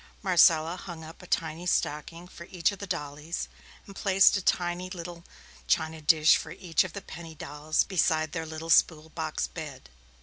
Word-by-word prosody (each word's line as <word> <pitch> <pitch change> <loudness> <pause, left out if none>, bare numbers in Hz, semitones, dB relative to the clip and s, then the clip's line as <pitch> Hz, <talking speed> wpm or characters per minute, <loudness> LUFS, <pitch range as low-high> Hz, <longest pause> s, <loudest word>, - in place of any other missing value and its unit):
Marcella 170 -3 +4
hung 170 -4 -9
up 160 +1 -11
a 180 - -13
tiny 165 +2 -2
stocking 165 +1 -2
for 170 -1 -11
each 175 0 0
of 200 - -9
the 200 - -6
dollies, 150 -1 -4 0.4
and 195 - -13
placed 195 0 +4
a 200 - 0
tiny 175 0 0
little 175 -1 -8 0.4
china 160 0 0
dish 155 +1 +5
for - - -7
each 165 -1 0
of 185 -3 -8
the 200 - -7
penny 165 -1 -10
dolls 150 +1 -1
beside 160 -4 +1
their 160 -1 -4
little 160 +1 -5
spool 160 -1 +3
box 160 -1 -3
bed. 140 - -9
165 Hz, 175 wpm, -28 LUFS, 155-180 Hz, 0.4 s, dish